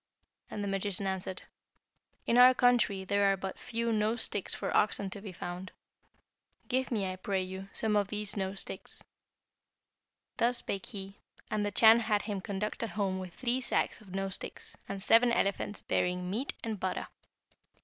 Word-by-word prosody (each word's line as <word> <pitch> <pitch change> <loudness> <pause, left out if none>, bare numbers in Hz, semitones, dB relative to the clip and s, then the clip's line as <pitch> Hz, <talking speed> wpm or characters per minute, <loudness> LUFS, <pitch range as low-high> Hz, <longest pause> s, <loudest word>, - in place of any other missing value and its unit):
And 205 - -4
the - - -2
magician 195 0 -1
answered, 190 -1 -3 0.8
'In 235 - +2
our 250 +1 +9
country 240 -6 +3
there 200 +1 +3
are 195 - +1
but 190 0 -5
few 230 0 -1
nose 220 +2 +1
sticks 205 - -2
for - - -2
oxen 200 -2 +2
to 200 - -5
be 200 -2 -7
found. 180 +1 -6 1.0
Give 260 0 0
me, 215 -5 0
I 185 0 -3
pray 190 0 -1
you, 190 +1 -7
some 220 -1 0
of 205 -2 +3
these 210 0 -3
nose 195 -1 -2
sticks.' - - -5 1.3
Thus 240 +1 +2
spake 200 0 -3
he, 200 -4 -7 0.3
and 215 -1 +1
the 205 - +1
Chan 220 +3 +7
had 215 -3 +1
him 205 -3 -3
conducted 210 +4 -3
home 195 -3 -1
with 185 -2 -7
three 255 0 +1
sacks 245 - 0
of 190 -3 -10
nose 195 0 -2
sticks, - - -5
and 195 -1 -4
seven 230 +3 +6
elephants 200 -1 0
bearing 180 0 0
meat 245 +8 -1
and 220 -3 -3
butter. 185 0 -2
200 Hz, 170 wpm, -31 LUFS, 190-225 Hz, 1.3 s, our